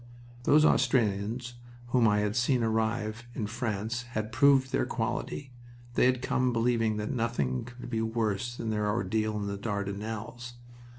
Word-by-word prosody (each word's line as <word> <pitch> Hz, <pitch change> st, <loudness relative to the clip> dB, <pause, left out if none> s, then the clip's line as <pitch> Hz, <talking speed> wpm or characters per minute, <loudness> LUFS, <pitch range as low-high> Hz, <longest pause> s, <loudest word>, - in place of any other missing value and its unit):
Those 150 Hz, +1 st, +6 dB
Australians 120 Hz, -2 st, +1 dB, 0.4 s
whom 120 Hz, -2 st, +4 dB
I 105 Hz, 0 st, +3 dB
had 105 Hz, +1 st, -1 dB
seen 120 Hz, 0 st, +2 dB
arrive 110 Hz, 0 st, -1 dB
in 110 Hz, -, -2 dB
France 110 Hz, 0 st, -2 dB, 0.2 s
had 110 Hz, +1 st, -2 dB
proved 130 Hz, 0 st, +4 dB
their -, -, +1 dB
quality. 135 Hz, -2 st, -3 dB, 0.4 s
They 125 Hz, -, +4 dB
had 130 Hz, 0 st, +1 dB
come 125 Hz, 0 st, +1 dB
believing 115 Hz, -2 st, +1 dB
that 105 Hz, 0 st, -2 dB
nothing 115 Hz, -, -1 dB
could 125 Hz, 0 st, -9 dB
be 115 Hz, -2 st, -1 dB
worse 115 Hz, 0 st, -1 dB
than 115 Hz, -2 st, -3 dB
their 105 Hz, -1 st, 0 dB
ordeal 110 Hz, -1 st, 0 dB
in 105 Hz, -, -2 dB
the 100 Hz, 0 st, -3 dB
Dardanelles. 105 Hz, +4 st, -4 dB
115 Hz, 155 wpm, -29 LUFS, 105-120 Hz, 0.4 s, Those